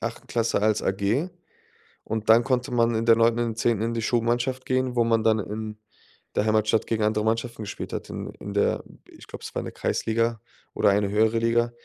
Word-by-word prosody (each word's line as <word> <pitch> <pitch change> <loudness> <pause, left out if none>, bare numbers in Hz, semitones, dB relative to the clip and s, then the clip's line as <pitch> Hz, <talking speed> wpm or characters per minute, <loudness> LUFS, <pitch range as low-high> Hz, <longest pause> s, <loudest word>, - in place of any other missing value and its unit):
8. - - -5
Klasse 115 -3 0
als 110 0 +2
AG 100 - 0 0.8
und 110 0 -4
dann 115 +2 +7
konnte 125 +1 -1
man 115 -1 +2
in 115 +1 0
der 115 -1 +6
9. 115 +1 +3
und 120 - +1
der 110 - -5
10. 115 -2 +1
in 115 +1 -1
die 115 - -2
Schulmannschaft 120 +3 0
gehen, 130 -1 0
wo 120 - +4
man 115 -1 +2
dann 110 0 +3
in 105 +1 -5 0.6
der 105 - +1
Heimatstadt 110 0 +2
gegen 110 -2 0
andere 105 0 +1
Mannschaften 115 0 -1
gespielt 105 - -6
hat, - - -5
in - - -5
in 100 - -7
der 100 - +1 0.3
ich - - -15
glaub, - - -9
es - - -8
war - - -1
in - - -7
der - - -6
Kreisliga 115 0 -1 0.3
oder - - +3
eine 100 0 +2
höhere 110 +2 +2
Liga. 120 +1 +1
115 Hz, 220 wpm, -25 LUFS, 110-120 Hz, 0.8 s, dann